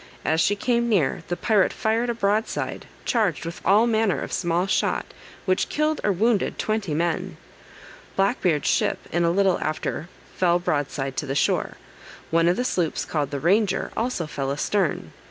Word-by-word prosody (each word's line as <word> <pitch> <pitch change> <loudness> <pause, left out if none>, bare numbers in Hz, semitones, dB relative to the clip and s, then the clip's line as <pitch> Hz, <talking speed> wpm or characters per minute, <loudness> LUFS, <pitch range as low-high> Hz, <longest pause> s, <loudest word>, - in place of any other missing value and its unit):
As 160 +1 +2
she 205 - +3
came 235 +2 0
near, 180 -11 +1
the 175 - -2
pirate 210 -3 +3
fired 225 +2 0
a 235 - -1
broadside, 215 0 -1 0.2
charged 210 - +1
with 170 +1 -6
all 205 +5 +5
manner 220 - +1
of - - -5
small 175 0 +1
shot, 195 - 0 0.4
which 185 0 +1
killed 305 +1 0
or 205 - +3
wounded 210 +2 +1
twenty 215 -8 -1
men. 170 0 -1 0.8
Black 195 +6 +1
Beard's 155 -5 +1
ship - - +2
in 175 +1 +1
a 170 - +3
little 190 +1 +2
after 155 +2 -3 0.3
fell 175 -2 +3
broadside 145 -5 -2
to 150 - -2
the 135 - -2
shore; - - +1 0.6
one 165 +1 +3
of 175 - +2
the 250 - 0
sloops 175 -9 -1
called 150 -3 -1
the 140 - -3
Ranger, 195 +5 +1
also 230 -7 -1
fell 140 -2 -3
astern. 150 - -1
185 Hz, 175 wpm, -24 LUFS, 160-220 Hz, 0.8 s, all